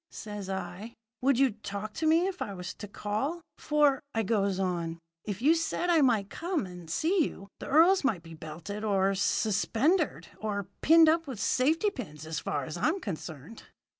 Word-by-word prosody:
says 205 Hz, -2 st, -7 dB
I. 190 Hz, +4 st, -5 dB, 0.3 s
'Would 270 Hz, 0 st, +3 dB
you 270 Hz, -1 st, +4 dB
talk 210 Hz, 0 st, -6 dB
to 320 Hz, -, -1 dB
me 330 Hz, +3 st, +4 dB
if 380 Hz, -1 st, -4 dB
I 200 Hz, -, -3 dB
was 180 Hz, 0 st, -6 dB
to 205 Hz, -, -9 dB
call? 215 Hz, -, -3 dB, 0.2 s
For,' 295 Hz, -3 st, +3 dB
I 225 Hz, -, +2 dB
goes 200 Hz, -2 st, +1 dB
on, 170 Hz, -3 st, -1 dB, 0.3 s
'if 205 Hz, +2 st, -4 dB
you 305 Hz, +4 st, +6 dB
said 335 Hz, +1 st, 0 dB
I 330 Hz, -2 st, +5 dB
might 220 Hz, -7 st, +2 dB
come 345 Hz, -, -2 dB
and 180 Hz, -3 st, -10 dB
see 330 Hz, -, +2 dB
you, 195 Hz, +1 st, -8 dB
the -, -, -7 dB
earls 340 Hz, +5 st, +5 dB
might 210 Hz, -11 st, 0 dB
be 165 Hz, -1 st, -11 dB
belted 160 Hz, +7 st, -7 dB
or 195 Hz, -2 st, +2 dB
suspendered, 225 Hz, -, +1 dB
or 200 Hz, -3 st, -3 dB
pinned 325 Hz, +1 st, +7 dB
up 330 Hz, 0 st, +3 dB
with 255 Hz, -7 st, -6 dB
safety 315 Hz, -, +2 dB
pins, 155 Hz, -, -8 dB
as 160 Hz, -1 st, -3 dB
far 145 Hz, -3 st, -2 dB
as 155 Hz, -, -6 dB
I 210 Hz, -, +1 dB
am 345 Hz, +5 st, 0 dB
concerned.' 165 Hz, -, -7 dB
215 Hz, 190 wpm, -29 LUFS, 190-310 Hz, 0.3 s, pinned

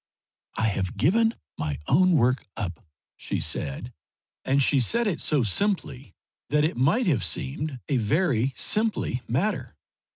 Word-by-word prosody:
"I 110 Hz, -, +1 dB
have 95 Hz, -1 st, -3 dB
given 225 Hz, -, +3 dB, 0.2 s
my 75 Hz, -3 st, -2 dB
own 185 Hz, +5 st, +4 dB
work 125 Hz, -3 st, +2 dB
up," 90 Hz, -6 st, -4 dB, 0.3 s
she -, -, -3 dB
said, 75 Hz, -, -3 dB, 0.5 s
and 135 Hz, +1 st, +2 dB
she 140 Hz, +1 st, +4 dB
said 230 Hz, -, +2 dB
it 195 Hz, -7 st, -1 dB
so 150 Hz, -5 st, +2 dB
simply 140 Hz, -, -1 dB, 0.3 s
that 150 Hz, +1 st, +3 dB
it 160 Hz, -, -1 dB
might 160 Hz, -, +2 dB
have 140 Hz, -, +2 dB
seemed 130 Hz, -, -3 dB
a 140 Hz, -, +1 dB
very 130 Hz, -, +1 dB
simply 215 Hz, -, 0 dB
matter. 175 Hz, -, -1 dB
135 Hz, 140 wpm, -26 LUFS, 115-185 Hz, 0.5 s, own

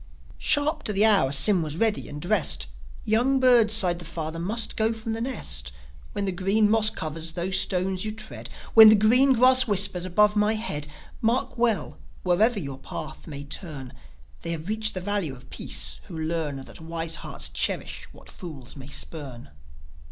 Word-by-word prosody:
Sharp 300 Hz, +1 st, +1 dB
to 210 Hz, -, 0 dB
the 205 Hz, +2 st, +3 dB
hour 195 Hz, -12 st, +4 dB
Sym 170 Hz, +7 st, +3 dB
was 155 Hz, -1 st, -3 dB
ready 220 Hz, +1 st, 0 dB
and 145 Hz, -, -7 dB
dressed. 175 Hz, +1 st, +1 dB, 0.4 s
"Young 245 Hz, +5 st, +2 dB
birds," 240 Hz, -4 st, +5 dB
sighed 180 Hz, -5 st, +2 dB
the -, -, -5 dB
father, 165 Hz, 0 st, -5 dB
"must 220 Hz, +6 st, 0 dB
go 220 Hz, +1 st, +1 dB
from 225 Hz, 0 st, -5 dB
the 225 Hz, -, -4 dB
nest. 70 Hz, -, -1 dB, 0.4 s
When 200 Hz, -, -2 dB
the 190 Hz, -, -1 dB
green 200 Hz, +4 st, +2 dB
moss 220 Hz, -1 st, +5 dB
covers 160 Hz, -1 st, -4 dB
those 185 Hz, +2 st, 0 dB
stones 185 Hz, 0 st, +1 dB
you 215 Hz, -, -3 dB
tread, 215 Hz, 0 st, -8 dB, 0.2 s
When 220 Hz, -1 st, +10 dB
the 215 Hz, -, +7 dB
green 250 Hz, +6 st, +4 dB
grass 255 Hz, +1 st, +4 dB
whispers 195 Hz, -3 st, +1 dB
above 210 Hz, +3 st, +2 dB
my 210 Hz, +1 st, +2 dB
head, 150 Hz, -10 st, -4 dB, 0.3 s
Mark 235 Hz, +3 st, 0 dB
well, 230 Hz, -9 st, -1 dB, 0.2 s
wherever 205 Hz, +6 st, +2 dB
your 140 Hz, -5 st, -7 dB
path -, -, -8 dB
may 145 Hz, -2 st, -7 dB
turn, 145 Hz, -3 st, -7 dB, 0.5 s
They 170 Hz, -, -3 dB
have 165 Hz, +3 st, -7 dB
reached 215 Hz, 0 st, -1 dB
the 185 Hz, -, -3 dB
valley 200 Hz, -3 st, -1 dB
of 130 Hz, -1 st, -12 dB
peace -, -, -2 dB
who 170 Hz, -, -9 dB
learn 160 Hz, -2 st, -2 dB
That 135 Hz, -, -11 dB
wise 165 Hz, 0 st, -2 dB
hearts -, -, -5 dB
cherish -, -, -2 dB
what -, -, -17 dB
fools 150 Hz, -, -10 dB
may 135 Hz, -2 st, -10 dB
spurn." 140 Hz, -, -5 dB
195 Hz, 180 wpm, -25 LUFS, 160-220 Hz, 0.5 s, When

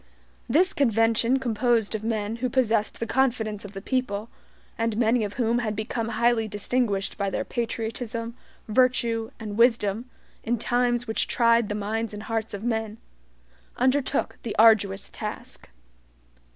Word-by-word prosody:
This 355 Hz, +10 st, +5 dB
convention 230 Hz, 0 st, +3 dB
composed 235 Hz, -3 st, +1 dB
of 220 Hz, -1 st, -3 dB
men 220 Hz, -1 st, -2 dB
who 250 Hz, +1 st, -1 dB
possessed 230 Hz, -4 st, +1 dB
the 230 Hz, -, -1 dB
confidence 230 Hz, -5 st, 0 dB
of 205 Hz, -1 st, -9 dB
the 195 Hz, 0 st, -7 dB
people, 230 Hz, -5 st, -2 dB, 0.4 s
and 225 Hz, -1 st, -1 dB
many 230 Hz, 0 st, +3 dB
of 205 Hz, -1 st, -4 dB
whom 235 Hz, -1 st, +1 dB
had 215 Hz, -3 st, -2 dB
become 220 Hz, +2 st, -3 dB
highly 235 Hz, -1 st, +2 dB
distinguished 205 Hz, -1 st, -1 dB
by 200 Hz, -1 st, 0 dB
their -, -, -2 dB
patriotism, 230 Hz, 0 st, -3 dB, 0.3 s
virtue 230 Hz, -1 st, +2 dB
and 215 Hz, -1 st, -6 dB
wisdom, 230 Hz, -1 st, +2 dB, 0.3 s
in 240 Hz, +1 st, 0 dB
times 240 Hz, +1 st, +1 dB
which 220 Hz, -, 0 dB
tried 230 Hz, -2 st, +3 dB
the 210 Hz, -, -2 dB
minds 215 Hz, +1 st, -3 dB
and 210 Hz, -, -7 dB
hearts 225 Hz, -1 st, -3 dB
of 200 Hz, -, -8 dB
men, 220 Hz, -2 st, -2 dB, 0.8 s
undertook 260 Hz, +2 st, +1 dB
the 230 Hz, -, -5 dB
arduous 210 Hz, -3 st, +4 dB
task. -, -, -6 dB
225 Hz, 145 wpm, -25 LUFS, 215-240 Hz, 0.8 s, This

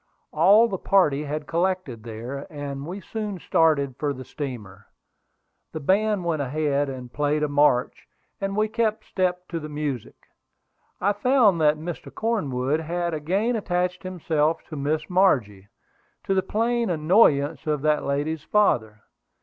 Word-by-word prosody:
All 215 Hz, +4 st, +6 dB
the 190 Hz, -5 st, -4 dB
party 150 Hz, -7 st, +2 dB
had 150 Hz, +1 st, -4 dB
collected 170 Hz, -8 st, -1 dB
there, 120 Hz, +6 st, -7 dB
and 140 Hz, -1 st, -6 dB
we 190 Hz, +4 st, -6 dB
soon 210 Hz, 0 st, -5 dB
started 150 Hz, -6 st, +2 dB
for 145 Hz, -2 st, 0 dB
the 130 Hz, -1 st, -9 dB
steamer. 105 Hz, -, -7 dB, 0.9 s
The 160 Hz, -, -4 dB
band 200 Hz, +4 st, +1 dB
went 160 Hz, -3 st, 0 dB
ahead 145 Hz, 0 st, 0 dB
and 125 Hz, -2 st, -8 dB
played 150 Hz, +1 st, 0 dB
a -, -, +2 dB
march, 145 Hz, -3 st, +2 dB, 0.3 s
and 195 Hz, 0 st, -2 dB
we 215 Hz, +1 st, +2 dB
kept 220 Hz, -1 st, -1 dB
step 180 Hz, -1 st, -1 dB
to 170 Hz, -, -3 dB
the 155 Hz, -1 st, -7 dB
music. 145 Hz, -5 st, -4 dB, 0.8 s
I 200 Hz, +3 st, +2 dB
found 210 Hz, -5 st, +3 dB
that 150 Hz, 0 st, +4 dB
Mr. 165 Hz, +2 st, -7 dB
Cornwood 150 Hz, -, -1 dB
had 170 Hz, +1 st, -2 dB
again 190 Hz, +10 st, 0 dB
attached 180 Hz, -4 st, -1 dB
himself 165 Hz, -4 st, -1 dB
to 155 Hz, -, -6 dB
Miss 150 Hz, +2 st, -1 dB
Margie, 125 Hz, -, +2 dB, 0.6 s
to 195 Hz, -, 0 dB
the 190 Hz, -, +2 dB
plain 235 Hz, +3 st, 0 dB
annoyance 155 Hz, -3 st, +3 dB
of 150 Hz, -2 st, -1 dB
that 150 Hz, -1 st, +2 dB
lady's 145 Hz, +3 st, -1 dB
father. 110 Hz, -, +1 dB
155 Hz, 150 wpm, -24 LUFS, 140-190 Hz, 0.9 s, All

